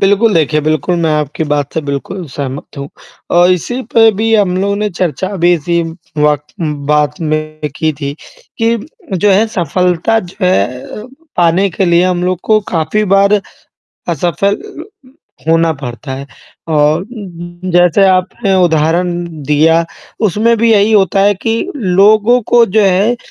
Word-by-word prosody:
बिल्कुल 205 +2 +3
देखें। 155 -2 +1
बिल्कुल, 155 +2 0
मैं 165 -1 +1
आपकी 150 +2 -3
बात 145 -1 -1
से 160 - 0
बिल्कुल 145 +6 -5
सहमत 140 +1 -6
हूँ 140 0 -6 0.5
और 175 +1 +5
इसी 185 - -1
पे 225 -1 +6
भी 225 0 +2
हम 195 -4 +2
लोग 200 +1 0
ने 210 0 -1
चर्चा 180 0 -2
अभी 175 0 +3
इसी 170 +1 -1 0.4
वक़्त 150 0 0 0.4
बात 150 -1 +1
में 155 -1 -3
की 155 -1 0
थी 140 -1 -3 0.5
कि 230 0 +1 0.5
जो 205 - +5
है 200 +3 +3
सफलता 180 +5 +1
जो - - -19
है 125 - 0
अ, 210 - -9 0.3
पाने 175 +3 +2
के 190 - -1
लिए 170 -1 +3
हम 180 -1 0
लोग 180 -1 -1
को 215 -1 +3
काफ़ी 165 +6 0
बार 200 +1 +4 0.7
असफल 175 +5 0 0.9
होना 165 0 +3
पड़ता 135 -1 -8
है 135 +1 -7 0.4
और 150 +1 +2
उम 240 +7 -11
उम - - -7 0.4
उम, 185 - -3
जैसे 175 +2 +4
आपने 190 +3 0
उदाहरण 170 +2 +1 0.3
दिया, 160 +3 +3 0.4
उसमें 220 +3 +2
भी 230 +1 +3
यही 210 0 +3
होता 195 -2 +3
है 205 +1 +4
कि 225 0 +1 0.2
लोगों 215 +3 +3
को 240 -1 +6
जो 215 +1 +1
है 195 +5 +2
180 Hz, 160 wpm, -13 LUFS, 155-205 Hz, 0.9 s, पे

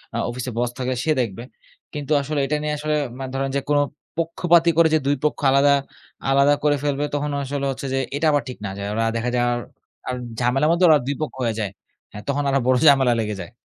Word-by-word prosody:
আ - - 0
অফিসে 125 +1 -4
বস 120 0 +1
থাকবে 130 0 -2
সে 160 - +1
দেখবে। 115 -1 -4 0.5
কিন্তু 145 0 -5
আসলে 145 +1 -2
এটা 145 +3 -1
নিয়ে 150 0 -1
আসলে 150 +1 -1 0.2
মা 135 - -4
ধরেন 135 0 -1
যে - - +2
কোন 145 - +3 0.4
পক্ষপাতি 170 +1 +3
করে 165 -1 +6
যে - - +3
২ 145 - +3
পক্ষ 150 - 0
আলাদা, 140 +1 +5 0.6
আলাদা, 140 +1 +5
করে 150 -1 +3
ফেলবে 145 0 0
তখন 145 0 -2
আসলে 140 +1 -3
হচ্ছে 135 - -6
যে - - +1 0.2
এটা 150 +3 -1
আবার 145 -1 +1
ঠিক 125 - -7
না। - - -3
যায় 100 0 -4
ওরা 115 +1 0
দেখা 115 +1 -1
যায় 120 0 +2 0.6
আর 125 - -1 0.2
ঝামেলার 130 +5 +2
মধ্যে 170 +2 +3
ওরা 155 - +7
২ 140 - -1
পক্ষ 155 - -3
হয়ে 115 -2 0
যায়। 100 -4 -2 0.4
হ্যা - - -7
তখন 140 +1 0
আরো 135 0 +2
বড় 130 - +4
ঝামেলা 135 -4 +5
লেগে 105 -1 -2
যায়। 85 - -9
140 Hz, 225 wpm, -22 LUFS, 125-150 Hz, 0.6 s, ওরা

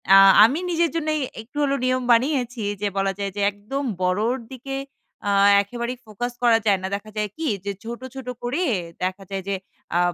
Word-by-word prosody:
আ - - +10 0.3
আমি 260 +9 +4
নিজের 335 -1 +2
জন্যই 310 -1 0 0.2
একটু 260 +7 -14
হলে 280 -1 +2
নিয়ম 255 0 +1
বানিয়েছি 245 -1 +2 0.2
যে 205 - +1
বলা 195 0 +2
যায় 200 -1 -2
যে 205 - -2
একদম 215 +8 -5 0.2
বড়র 205 +7 +2 0.2
দিকে 265 +1 -6 0.5
আ - - +2 0.3
একেবারেই 235 +4 -4
ফোকাস 240 +3 -4
করা 235 -2 +6
যায় 200 -3 +4
না। 190 - -2
দেখা 215 +2 -8
যায় 210 -1 0
কি? 320 -1 -2 0.2
যে 200 - -1
ছোট, 235 +1 -6 0.2
ছোট 265 -2 -7 0.2
করে 265 +9 -1 0.4
দেখা 185 +2 -2
যায় 195 -1 -3
যে 200 - 0 0.4
আ - - +4
235 Hz, 190 wpm, -23 LUFS, 205-270 Hz, 0.5 s, আ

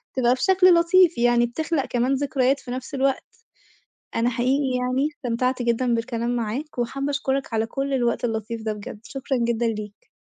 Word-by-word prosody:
تبقى 245 -1 +3
بشكل 370 +6 +4
لطيف، 340 -3 +4
يعني 240 0 +3
بتخلق 310 +3 -2
كمان 245 +2 0
ذكريات 275 -1 +1
في 245 - -9
نَفس 260 +2 -6
الوقت. 270 0 +1 0.9
أنا 235 +1 +1
حقيقي 255 +2 0
يعني 255 +3 +1
استمتعت 250 -3 -2
جدًا 240 +1 +1
بالكلام 235 +1 -2
معاك 245 +6 -4
وحابة 275 +4 -2
أشكرك 275 -3 -2
على 220 0 +1
كُلّ 275 +3 -3
الوقت 240 -2 0
اللطيف 225 0 -3
ده، 220 - -1
بجد 210 0 -8
شكرًا 270 0 -3
جدًا 235 0 0
ليك. 215 - -5
250 Hz, 165 wpm, -23 LUFS, 235-275 Hz, 0.9 s, بشكل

